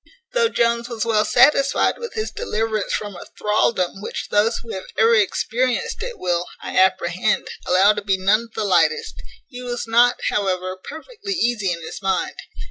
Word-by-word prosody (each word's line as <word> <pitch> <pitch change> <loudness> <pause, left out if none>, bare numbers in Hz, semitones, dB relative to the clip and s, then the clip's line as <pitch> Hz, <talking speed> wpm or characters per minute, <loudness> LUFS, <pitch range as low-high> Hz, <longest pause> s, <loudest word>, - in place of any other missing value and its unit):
Though 470 -2 +3
Jones 235 - 0
was 230 -2 -3
well 215 -2 +2
satisfied 275 +2 +3
with 470 0 -7
his 435 -1 -3
deliverance 220 - -2
from 205 -2 -3
a - - -10
thraldom 210 -3 0
which - - -5
those 215 +3 +2
who 230 - -8
have 190 - -6
ever 225 +1 +5
experienced 235 - 0
it 485 +1 -5
will, 175 -1 -1
I - - -7
apprehend, 185 +2 +2 0.2
allow 190 +3 +5
to 210 - -4
be 195 -1 0
none 205 +5 +2
of 230 - -21
the - - -1
lightest, 165 -5 +1 0.3
he 250 -2 -9
was 245 -1 -4
not, 240 +2 +4
however, 185 -2 -1
perfectly 395 - -7
easy 235 - 0
in 170 -1 -5
his 175 - -8
mind. 190 -2 -1
215 Hz, 175 wpm, -21 LUFS, 190-240 Hz, 0.3 s, ever